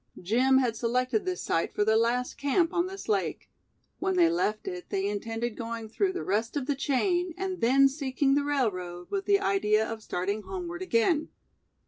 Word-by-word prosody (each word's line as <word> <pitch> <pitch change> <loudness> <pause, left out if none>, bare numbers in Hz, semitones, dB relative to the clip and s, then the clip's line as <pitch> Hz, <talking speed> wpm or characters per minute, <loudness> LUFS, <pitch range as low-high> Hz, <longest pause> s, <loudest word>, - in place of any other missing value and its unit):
Jim 250 +8 +3
had 245 -4 +1
selected 250 - 0
this 365 -1 -3
site 165 - -1
for 210 - +2
their 220 0 +3
last 240 +2 +1
camp 330 +5 +1
on 350 +1 +1
this 390 +1 -8
lake. 415 -3 -1 0.5
When 380 0 0
they 340 -2 +5
left 215 -11 -1
it, 180 -1 -6
they 195 0 -1
intended 225 +3 -3
going 230 -2 -5
through 380 - 0
the 365 - -4
rest 220 +7 -1
of 275 - -2
the 285 - +1
chain, 350 +6 0
and 380 -1 -3
then 270 +4 +5
seeking 275 0 0
the 285 +1 +2
railroad, 185 -11 -2
with 395 -1 -2
the 400 -1 +4
idea 210 - +2
of 225 -1 -6
starting 200 +2 -2
homeward 350 - -6
again. 310 0 +1
255 Hz, 185 wpm, -28 LUFS, 220-345 Hz, 0.5 s, they